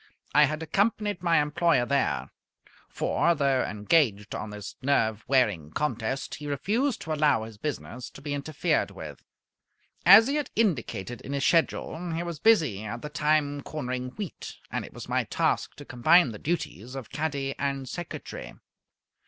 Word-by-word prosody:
I 150 +2 +7
had 155 +2 -3
accompanied 205 +1 0
my 170 -3 +3
employer 150 -2 +2
there; 70 - 0 0.6
for, 170 0 +1
though 140 -3 +2
engaged 105 -1 +1
on 110 - -4
this 105 -1 -8
nerve 115 -5 +1
wearing 120 - +2
contest, 130 - -2
he 150 - -6
refused 215 - 0
to 160 - -3
allow 150 -7 +3
his 110 -2 -10
business 125 -2 -5
to - - -13
be 145 -1 -3
interfered 145 +1 0
with. - - -9 0.8
As 200 +5 +9
he 280 +4 0
had 295 -3 -2
indicated 125 - -1
in 140 - -6
his 140 -1 0
schedule, 165 0 +1
he 165 +1 -2
was 170 -3 -5
busy 155 - +3
at 120 +3 -6
the 150 - -4
time 150 -1 +1
cornering 125 -4 -4
wheat; 205 -5 -6 0.2
and - - -2
it - - -11
was - - -8
my - - 0
task - - 0
to 145 - -11
combine 145 +4 +4
the 105 - -8
duties 135 - -3
of 135 -4 -7
caddy 140 -3 -2
and 140 -1 -2
secretary. 175 +5 -7
145 Hz, 160 wpm, -27 LUFS, 125-165 Hz, 0.8 s, As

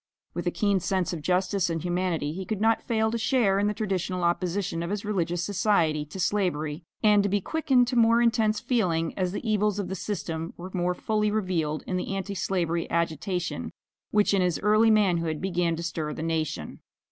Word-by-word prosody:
With - - -3
a - - +5
keen 200 -3 +1
sense 185 0 -1
of 165 - -4
justice 185 +2 +1
and 165 -1 -1
humanity, 175 -4 -1
he 190 +3 -5
could 195 +2 -3
not 225 +1 +3
fail 220 -1 0
to 230 - -2
share 220 -5 +2
in 205 - +2
the 210 - 0
traditional 185 -3 -2
opposition 175 0 0
of 170 - -3
his 205 +1 -3
religious 175 -4 -1
society 175 -6 +1
to 160 +6 -9
slavery, 170 -5 0 0.2
and 210 -1 +6
to 200 - 0
be 205 +1 +2
quickened 265 - +2
to 250 - -2
more 230 0 +5
intense 220 -2 +2
feeling 175 -10 0
as 185 -2 -1
the 205 - -5
evils 210 -1 +1
of 200 -3 -3
the 190 - -3
system 165 -5 -4
were 180 +2 -8
more 180 -1 0
fully 210 +2 0
revealed 180 -8 -1
in 185 - -2
the 195 +2 -3
Anti 195 +1 -3
slavery 170 -3 -1
agitation 170 - -2 0.4
which 210 -1 +3
in 195 - +3
his 180 -2 +1
early 215 +2 +4
manhood 175 -7 +2
began 175 -3 0
to 170 - -5
stir 160 -2 -3
the 155 - -5
nation. 160 - -2
185 Hz, 200 wpm, -27 LUFS, 170-210 Hz, 0.4 s, and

